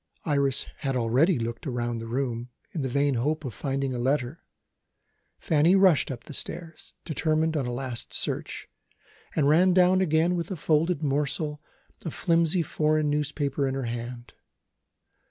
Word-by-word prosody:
Iris 140 -3 +1 0.2
had 135 -2 -2
already 130 +8 +3
looked 115 +3 -4
round 120 -2 -2
the 115 - -6
room, 120 -1 -2 0.2
in 160 - -3
the 135 - -2
vain 140 +2 +2
hope 150 +6 -1
of 125 - -4
finding 135 +4 -2
a 125 - -3
letter. 130 +3 -1 0.9
Fanny 160 +4 +3
rushed 190 -6 +4
up 120 -3 -6
the 150 - -10
stairs, 165 +3 -6
determined 160 0 0
on 135 -5 -1
a - - -2
last 125 -1 -5
search - - -2 0.7
and 145 -3 +3
ran 175 +5 +5
down 185 0 +5
again 165 0 +2
with 170 -2 -2
a 190 - -3
folded 160 +1 +1
morsel 150 +1 -1 0.4
of 165 - -5
flimsy 170 0 +2
foreign 155 -1 +1
notepaper 145 -1 -1
in 135 - -2
her 135 - -2
hand. 120 +1 -6
145 Hz, 155 wpm, -27 LUFS, 125-160 Hz, 0.9 s, ran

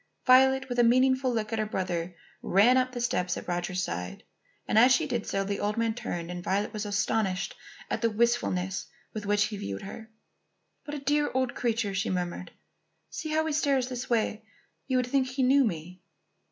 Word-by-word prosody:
Violet, 265 +1 +5
with 245 -1 -2
a - - +6
meaning 255 +3 +5
look 230 -4 -1
at 225 - 0
her 215 - +1
brother, 180 -3 -3 0.3
ran 215 +7 +4
up 255 0 +2
the 245 - -5
steps 180 -7 0
at - - -8
Roger's 180 +1 -2
side. 90 - -5 0.4
As 235 +4 +5
she 320 +4 +4
did 240 -6 -3
so, 195 - 0
the 200 +1 -3
old 210 +1 -1
man 230 -1 +1
turned 175 -7 -5
and 175 0 -6
Violet 200 +3 -1
was 210 -1 -3
astonished 205 -2 0 0.3
at - - -3
the 230 - +3
wistfulness 210 -5 0 0.3
with 210 -2 -5
which 205 0 +3
he 210 0 -3
viewed 100 - -5
her. 220 +3 -9 0.8
"What 295 - -5
a - - -4
dear 295 +1 +2
old 260 -2 +1
creature!" 230 -4 -1
she 195 +3 -1
murmured. 180 0 -3 0.6
"See 315 - -5
how 315 +1 +1
he 315 - -1
stares 275 -4 +1
this 250 -1 -5
way. 220 -2 0 0.4
You 260 -2 +1
would 250 - +1
think 260 +1 +1
he 260 +1 -1
knew 270 +2 +5
me." 180 -3 -4
225 Hz, 195 wpm, -28 LUFS, 190-255 Hz, 0.8 s, a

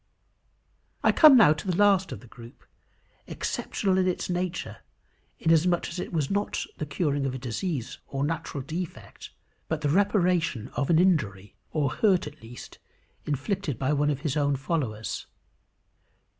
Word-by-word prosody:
I - - +5
come 305 -5 +8
now 210 -10 +7
to 155 +6 -8
the 180 - 0
last 200 -2 +4
of 100 - -7
the 125 - -15
group, 115 +1 -14 0.6
exceptional 190 -2 -1
in 185 - +2
its 180 0 -2
nature, 175 - -3 0.6
inasmuch 165 +2 +2
as 175 - -6
it - - -5
was 155 -5 -1
not 200 +1 -1
the 150 - -3
curing 145 -2 -1
of 130 - -3
a - - -3
disease 130 - -4
or 135 0 -3
natural 145 -2 -3
defect, 165 +5 -7 0.4
but 160 -1 -2
the 145 - 0
reparation 175 - +1
of 140 - -2
an 165 - +5
injury, 105 - +1
or 145 -4 0
hurt 195 -5 +2
at 150 0 -10
least, 120 +2 -11 0.5
inflicted 145 - -2
by 135 +4 0
one 145 0 +2
of 140 -2 -2
his 150 -4 -2
own 145 -2 +1
followers. 130 -6 -3
155 Hz, 155 wpm, -27 LUFS, 135-180 Hz, 0.6 s, come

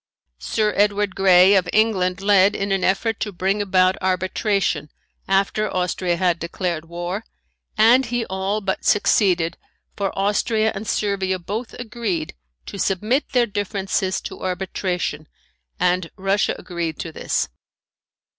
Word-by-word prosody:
Sir 215 -1 0
Edward 205 -1 +2
Grey 190 0 +6
of 185 -3 +2
England 195 -4 +1
led 200 0 +4
in 200 0 -2
an 195 -1 +1
effort 215 +4 +1
to 210 - -2
bring 195 +3 0
about 185 -2 +3
arbitration 185 -3 0 0.4
after 200 +2 +1
Austria 180 -1 0
had 175 -1 +1
declared 170 -1 -3
war, 175 +5 -4 0.5
and 240 +4 +5
he 240 -1 -1
all 190 +2 -2
but 195 -1 -2
succeeded 180 -5 +2 0.4
for 200 -1 -1
Austria 215 +2 +1
and 210 +2 -6
Servia 195 -2 0
both 210 +7 -5
agreed 215 -9 -3 0.3
to 200 - -8
submit 215 +10 0
their 245 -2 +4
differences 195 -2 -2
to - - -8
arbitration 180 -4 -3 0.5
and 180 -1 +1
Russia 195 +1 +1
agreed 170 -3 -4
to 165 - -5
this. - - -1
195 Hz, 130 wpm, -21 LUFS, 180-210 Hz, 0.5 s, Grey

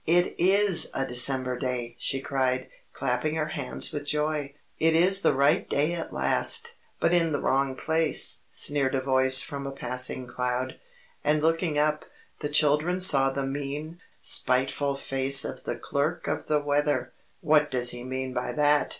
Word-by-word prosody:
"It 175 +2 +3
IS 195 0 +3
a 135 - -1
December 130 0 -1
day!" 125 -2 -4
she 135 -1 -3
cried, 130 -2 -1 0.2
clapping 135 +4 -2
her 155 -1 -2
hands 140 -4 -1
with 145 -1 -6
joy. 150 -1 -2 0.2
"It 160 0 +3
is 190 +4 +4
the 145 - +2
right 140 +2 +2
day 150 +4 +1
at 170 -1 -5
last!" 465 +1 0 0.3
"But 170 - +2
in 165 -3 +2
the 145 - 0
wrong 135 0 0
place!" 160 +1 0
sneered 140 -2 0
a 130 - 0
voice 130 0 +5
from 140 -1 -6
a - - -5
passing 125 -1 -2
cloud. 125 +1 -3 0.4
And 150 +1 +1
looking 165 -1 +1
up, 150 +1 0 0.3
the 145 - -4
children 150 +4 +2
saw 135 -7 +5
the 135 0 -3
mean, 145 +4 -5 0.2
spiteful 135 +2 +1
face 135 0 +2
of - - -7
the - - -3
Clerk 150 +5 -3
of - - -3
the 150 -1 +1
Weather. 145 0 0 0.3
"What 150 -2 +3
does 125 -1 0
he 120 0 -8
mean 130 0 -4
by - - -3
that?" 150 -1 +2
145 Hz, 165 wpm, -26 LUFS, 130-155 Hz, 0.4 s, voice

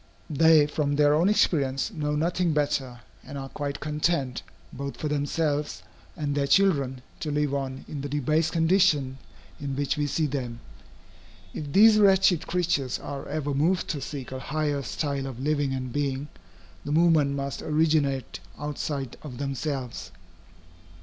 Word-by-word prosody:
They, 155 0 +6
from 145 -1 -1
their 145 0 +4
own 165 +6 +3
experience, 140 -7 +2
know 150 -3 -1
nothing 170 +2 +1
better, 135 -4 -1 0.2
and 140 - -8
are 135 0 -6
quite 145 0 -4
content, 150 -4 -1 0.3
both 140 +1 -5
for 155 - -3
themselves 150 - -1 0.3
and 145 -2 -1
their 140 -1 0
children, 140 -8 +2 0.2
to 155 - -3
live 145 -1 0
on 135 -1 -3
in 145 - -5
the 145 - -4
debased 150 +3 +1
condition 160 -6 +2 0.4
in 140 -1 -4
which 140 +1 -1
we 145 0 0
see 155 +2 0
them. 125 -5 -3 0.9
If 145 -2 -5
these 215 +5 +7
wretched 190 -4 +4
creatures 165 -7 0
are 140 -1 -7
ever 145 -1 -2
moved 165 +7 +1
to 145 - -2
seek 135 -2 -6
a 130 - -4
higher 145 +1 -1
style 140 0 -3
of 130 -3 -7
living 145 0 0
and 130 -2 -4
being, 140 0 -2 0.5
the 145 - -4
movement 155 -3 +4
must 140 0 -4
originate 150 -4 +1 0.2
outside 145 -3 -4
of 135 -5 -8
themselves. 135 - -4
145 Hz, 150 wpm, -26 LUFS, 135-155 Hz, 0.9 s, these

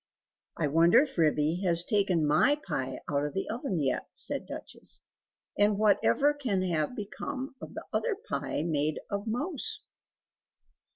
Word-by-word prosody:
"I - - +1
wonder 165 - +6
if 275 -3 -7
Ribby 155 +2 +2
has 170 -2 +2
taken 190 -6 +2
MY 255 - +4
pie 130 -6 -3
out 145 -1 0
of 150 +3 -3
the 195 - -1
oven 230 - -2
yet?" 135 -3 0
said - - -1
Duchess, - - -7 0.6
"and 205 0 +4
whatever 210 - +4
can 235 -10 -1
have 165 +3 0
become 255 +5 -5
of - - -9
the - - -5
other 475 -4 +1
pie 400 - -3
made 155 -2 0
of 200 +2 -2
mouse?" 345 - -2
195 Hz, 150 wpm, -29 LUFS, 155-255 Hz, 0.6 s, wonder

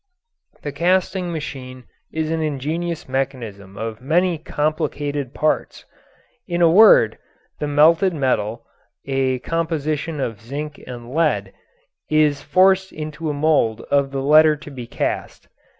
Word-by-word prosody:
The 145 - -3
casting 180 +3 0
machine 130 -5 -6 0.3
is 160 0 -2
an 165 0 -1
ingenious 155 +3 -3
mechanism 115 -8 -4
of 110 +1 -5
many 170 +4 +1
complicated 145 -3 -2
parts. 155 - -1 0.6
In 175 -2 -2
a 170 -2 +5
word, 180 - +6 0.4
the 150 - -2
melted 160 +6 +4
metal 120 -7 -1 0.4
(a 135 -1 0
composition 155 -2 -2
of 115 -6 -3
zinc 145 +5 -6
and 120 -1 -8
lead) 160 0 0 0.6
is 150 -2 +2
forced 190 +2 +3
into 155 +1 -5
a - - -1
mold 145 -7 +2
of 140 -1 +3
the 135 -1 -3
letter 155 +2 +6
to 150 0 -11
be 125 -4 -8
cast. - - -4
150 Hz, 130 wpm, -21 LUFS, 130-160 Hz, 0.6 s, word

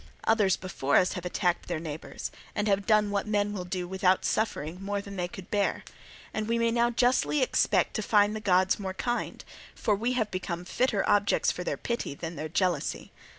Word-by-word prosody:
Others 210 -4 +3
before 160 -7 -1
us 185 - +3
have 180 - -6
attacked 175 0 0
their 170 -3 -2
neighbours 155 -1 -6 0.2
and 210 0 0
have 200 -1 +1
done 210 -2 +4
what 200 +1 -1
men 205 -1 +1
will 185 -3 -4
do 180 0 -3
without 190 0 +2
suffering 180 -5 -1
more 200 +1 -1
than 200 0 -8
they 180 -2 -1
could 180 0 -11
bear; 205 -1 0 0.5
and 215 0 -2
we 230 +1 +1
may 230 0 +2
now 235 0 +3
justly 250 +4 +2
expect - - +2
to - - -1
find 210 0 +3
the - - -3
gods 190 -1 +3
more 190 -2 -4
kind, 240 +4 -3 0.3
for 215 - +1
we 235 +5 -1
have 220 -4 0
become 180 -1 -4
fitter 235 0 +1
objects 205 0 +3
for 180 - -5
their - - -2
pity 235 -11 -3
than 165 +3 -6
their 155 0 -5
jealousy. 175 -2 -1
200 Hz, 200 wpm, -28 LUFS, 180-215 Hz, 0.5 s, done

